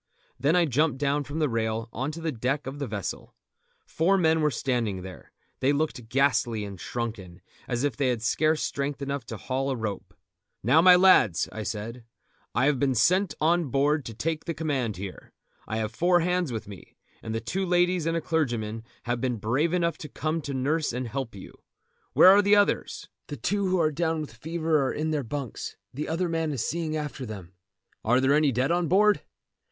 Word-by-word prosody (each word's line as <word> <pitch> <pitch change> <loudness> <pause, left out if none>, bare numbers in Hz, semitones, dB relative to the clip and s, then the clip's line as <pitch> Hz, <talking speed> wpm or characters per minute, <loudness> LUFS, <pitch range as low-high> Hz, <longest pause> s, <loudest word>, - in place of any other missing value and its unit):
Then 150 +5 +2
I 175 -1 +4
jumped 145 0 +1
down 145 +1 0
from 145 +3 -6
the 155 -2 +2
rail 115 -1 -1
on 130 +4 -2
to 165 - -7
the 165 -1 -1
deck 135 +4 -2
of 135 +2 -6
the 140 - -3
vessel. 105 -4 -5 0.5
Four 185 +5 +2
men 160 -3 +3
were 150 - +3
standing 115 -9 -1
there. 95 -2 -11 0.3
They 135 - +3
looked 140 -6 -2
ghastly 125 -4 +1
and 100 -3 -9
shrunken, 110 -7 -5 0.3
as 120 +1 -1
if 145 -5 0
they 135 +2 0
had 120 -3 -1
scarce 155 +6 +2
strength 140 0 -3
enough 140 -4 -4
to 115 - -6
haul 135 +5 -2
at - - +1
a - - -4
rope. 100 -3 -5 0.5
"Now, 130 +8 +5
my 180 +1 +8
lads," 180 - +5
I 110 - -6
said, 115 +3 -5 0.5
"I - - +3
have 145 -3 +2
been 135 -1 +1
sent 185 - +3
on 170 +2 +2
board 145 +3 +1
to 115 - -7
take 160 +5 -2
the 165 - -3
command 135 - -2
here. 95 -1 -8 0.3
I 110 - -2
have 110 0 -2
four 175 +6 +3
hands 180 -3 0
with 110 -3 -5
me, 100 -2 -12 0.3
and 110 0 -3
two 190 +1 -1
ladies 180 -2 +2
and 165 0 +1
a - - -2
clergyman 120 -9 -1 0.2
have 120 0 -2
been 130 -2 0
brave 125 +10 0
enough 170 -3 0
to 150 - -8
come 155 +3 -2
to 140 -1 -5
nurse 145 +4 0
and 125 +1 -3
help 125 -2 -4
you. 95 - -10 0.6
Where 185 - +8
are 200 +2 +7
the 205 +1 +5
others?" 205 0 +1 0.2
"The - - -6
two 200 -1 0
who 185 0 +2
are 155 -2 +2
down 160 +1 -1
with 150 - -7
the - - -17
fever 160 +2 0
are 130 - 0
in 155 +1 -2
their 150 -2 -1
bunks; 130 -1 -5 0.2
the 145 +4 -4
other 170 +3 0
man 165 -2 -1
is 125 -5 -2
seeing 160 -1 -2
after 150 -3 -5
them." 100 -6 -8 0.5
"Are 125 +3 +3
there 135 +2 +3
any 150 -1 +4
dead 130 +5 0
on 175 -1 +1
board?" 205 +5 +4
140 Hz, 210 wpm, -27 LUFS, 115-160 Hz, 0.6 s, my